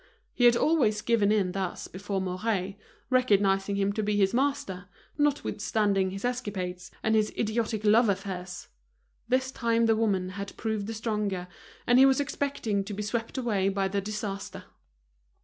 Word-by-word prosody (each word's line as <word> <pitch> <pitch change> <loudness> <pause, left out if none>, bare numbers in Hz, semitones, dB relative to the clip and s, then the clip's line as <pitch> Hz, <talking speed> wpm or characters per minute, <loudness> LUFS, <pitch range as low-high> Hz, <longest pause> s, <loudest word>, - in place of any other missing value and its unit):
He 245 - +2
had 240 0 +7
always 240 -7 +2
given 215 -3 +3
in 200 -4 +2
thus 190 -1 -4
before 195 +1 -4
Mouret, 190 +1 -2 0.4
recognizing 200 -5 +3
him 200 0 +1
to 215 - -1
be 210 0 0
his 195 0 +3
master, 235 -8 -1 0.3
notwithstanding 210 -9 +1
his 195 +4 -5
escapades 190 -8 -3
and 220 - +2
his 215 -1 +2
idiotic 220 -1 -1
love 220 +2 +5
affairs. 185 -2 -4 0.6
This 260 +1 +1
time 230 -3 +1
the 225 -1 +4
woman 200 -5 0
had 200 +2 -7
proved 215 -2 -2
the 225 - -4
stronger, 210 -5 -2 0.4
and 245 +1 +5
he 270 - +8
was 265 0 +3
expecting 280 -8 -1
to 205 0 -5
be 210 - -3
swept 225 +4 -3
away 210 -6 +1
by 195 0 0
the 200 +1 -1
disaster. 205 -1 -5
210 Hz, 160 wpm, -28 LUFS, 195-230 Hz, 0.6 s, he